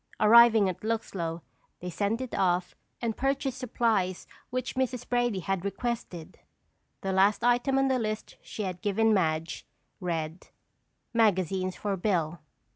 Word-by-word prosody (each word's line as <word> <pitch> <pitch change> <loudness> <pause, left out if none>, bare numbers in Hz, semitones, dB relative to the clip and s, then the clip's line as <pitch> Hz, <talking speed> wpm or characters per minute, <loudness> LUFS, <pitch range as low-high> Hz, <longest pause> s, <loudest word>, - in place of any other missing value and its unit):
Arriving 220 -1 +7
at 185 - -4
Luxlow, 180 -7 -3 0.4
they 180 0 -6
sent 210 +7 -1
it 255 - -6
off 180 -1 +1 0.3
and 225 -2 -1
purchased 270 -1 -1
supplies 225 -7 0 0.2
which 255 0 -3
Mrs. 255 -1 -2
Brady 240 -5 0
had 190 0 -2
requested. 200 -5 -4 0.6
The 195 0 -2
last 195 +3 +3
item 245 +3 +3
on 270 0 +3
the 260 -1 +1
list 215 -1 -4
she 215 - -6
had 185 -2 -4
given 220 +2 +2
Madge, 160 -4 0 0.4
read: 165 -2 -4 0.7
"magazines 190 -4 +1
for 205 -2 -2
Bill." 175 -4 0
205 Hz, 135 wpm, -28 LUFS, 180-235 Hz, 0.7 s, Arriving